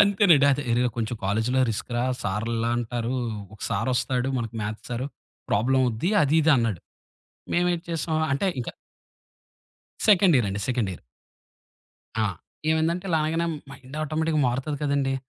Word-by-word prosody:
అంతేనండి. 195 -8 +5
అదే 145 +2 -1
అరే 120 +1 +3
కొంచెం 115 +1 -2
కాలేజిలో 110 +6 +1
రిస్క్‌రా 120 +3 -2 0.2
సారిలా 115 +3 -1
అంటారు. 120 +1 -2 0.4
ఒక 105 - -17
సారొస్తాడు 130 0 0
మనకి 115 -1 -4
మ్యాథ్ 105 +1 -4
సారు, 125 +3 -2 0.4
ప్రాబ్లమవుద్ది 125 - +2
అది 150 +2 +3
ఇది 160 - +4
అన్నాడు. 115 -7 0 0.7
మేమేటి 175 0 +1
చేశాం 160 -1 -1 0.2
అంటే 140 +8 +1
ఇంకా 120 - -5 1.4
సెకండ్ 190 -5 +6
ఇయరండి. 100 -3 -1
Second 120 -6 0
year. - - -10 1.2
ఆ! - - +3 0.5
ఏమైందంటే 165 +4 +1
ఇలా 160 -2 +2
అనగానే 165 +2 0 0.2
మైండ్ 135 +1 -12
ఆటోమేటిక్‌గా 155 0 0
మారుతది 135 +4 -2
కదండీ! 140 -2 +1
130 Hz, 130 wpm, -25 LUFS, 115-160 Hz, 1.4 s, సెకండ్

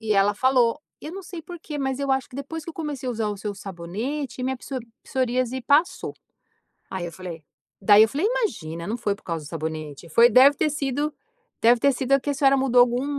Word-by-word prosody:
E 220 -1 0
ela 200 +1 +3
falou: 255 +3 +2 0.2
"Eu 305 - -7
não 390 +2 -7
sei 350 -3 -8
porquê, 320 -3 -7
mas 265 -1 -1
eu 280 -1 -1
acho 265 -1 +1
que 250 - -11
depois 290 +3 -6
que 335 - -6
eu - - -14
comecei 295 -5 -5
a - - 0
usar 220 -2 -1
o 205 - -3
seu 205 +1 -5
sabonete, 220 - -5
minha 260 +1 -1
psorí 255 -1 -6 0.2
psoríase 255 0 -1
passou." 295 +8 +2 0.8
Aí 185 -2 -3
eu 170 - -6
falei 170 -2 -8 0.4
daí 205 +2 +7
eu 220 - +2
falei: 305 - 0
"Imagina, 170 - -2
não 225 +3 -2
foi 210 -4 -1
por 205 - -24
causa 165 -3 -4
do - - -9
sabonete. 155 -1 -5
Foi 235 +9 +6
deve 265 +5 +7
ter 305 - +1
sido 290 +1 -1 0.5
deve 235 +1 +6
ter 280 +3 +4
sido 265 +1 -1
a 275 - +6
que 290 - -3
a - - -1
senhora 275 0 +4
mudou 255 -2 +4
algum 245 +2 +2
250 Hz, 230 wpm, -24 LUFS, 205-280 Hz, 0.8 s, daí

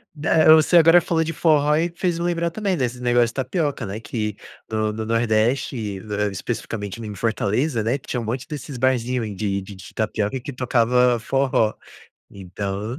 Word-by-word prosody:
Da 155 +1 +5
você 160 +2 +5
agora 165 +1 +7
falou 160 -1 0
de 165 - -3
forró 150 -2 +3
e 170 +2 0
fez 175 -2 -1
eu 170 - -2
lembrar 170 -1 0
também 195 +1 -1
desse 125 -3 -2
negócio 120 -1 +3
de 115 - -8
tapioca, 135 - -2
né? 100 +3 -5
Que 105 -3 -4 0.3
no 110 -1 0
no 110 +1 -5
nordeste, 110 -2 0 0.3
especificamente 105 0 -5
em 105 -2 -6
Fortaleza, 115 +4 0
né, 120 +5 0
tinha 125 -1 -4
um - - -4
monte 125 +6 -4
desses 145 -4 -7
barzinho 125 -1 +1
ai, 105 -2 -5
de 100 -1 -2
de 95 -1 -11
tapioca 110 +3 -1
que 140 - -7
tocava 125 -1 +2
forró, 130 -3 +1 0.6
então. 100 +5 -5
120 Hz, 170 wpm, -22 LUFS, 110-150 Hz, 0.6 s, agora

